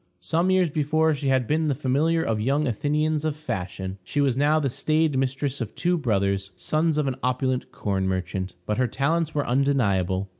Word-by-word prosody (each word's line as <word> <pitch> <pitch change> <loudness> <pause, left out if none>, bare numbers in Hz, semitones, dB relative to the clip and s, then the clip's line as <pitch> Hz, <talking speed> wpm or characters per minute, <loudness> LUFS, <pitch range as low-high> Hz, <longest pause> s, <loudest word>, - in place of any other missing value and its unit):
Some 165 - 0
years 185 -4 +3
before 155 +2 +2
she 140 -1 -3
had 130 -2 +2
been 155 +5 +1
the 140 - +1
familiar 150 +5 +1
of 110 -1 -1
young 140 +6 +1
Athenians 150 +5 0
of 155 -2 -1
fashion; 95 - -5
she 120 - -3
was 135 -4 +2
now 145 +3 +3
the 145 - 0
staid 155 +3 +1
mistress 135 +1 -1
of 115 - -5
two 180 +1 +1
brothers, 100 - 0
sons 155 - 0
of 150 - +1
an 135 -2 -2
opulent 130 0 -1
corn 95 -2 -1
merchant. 95 0 -3
But 105 +3 -1
her 130 - +3
talents 160 +5 0
were 145 - 0
undeniable. 100 -8 +1
135 Hz, 190 wpm, -25 LUFS, 105-155 Hz, -, years